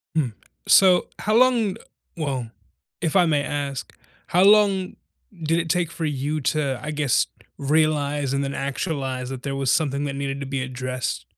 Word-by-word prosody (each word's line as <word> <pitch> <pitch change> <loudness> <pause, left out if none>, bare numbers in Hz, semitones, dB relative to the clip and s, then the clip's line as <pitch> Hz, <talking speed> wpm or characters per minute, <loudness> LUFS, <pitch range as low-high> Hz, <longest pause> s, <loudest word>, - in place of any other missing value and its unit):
Mm. 135 -8 0 0.3
So 185 -2 +6
how 215 +1 0
long 235 -5 +3 0.4
well, 135 -7 -3 0.5
if 165 0 -1
I 180 -2 +6
may 150 -3 +2
ask, 140 -2 -4 0.3
how 180 +2 +3
long 200 -2 +4 0.5
did 165 +2 +2
it 165 -1 -3
take 175 -2 +1
for 165 - -4
you 150 +1 -2
to, 140 -2 0
I 150 - -5
guess, 145 -4 +1 0.3
realize 145 -1 +1
and 140 0 0
then 140 - -3
actualize 135 -2 -3
that 130 -1 -7
there 140 -1 -3
was 135 -1 -1
something 145 -1 +1
that 140 -1 -3
needed 140 0 -3
to 140 - -4
be 135 -1 -2
addressed? 130 0 -4
145 Hz, 170 wpm, -23 LUFS, 135-165 Hz, 0.5 s, So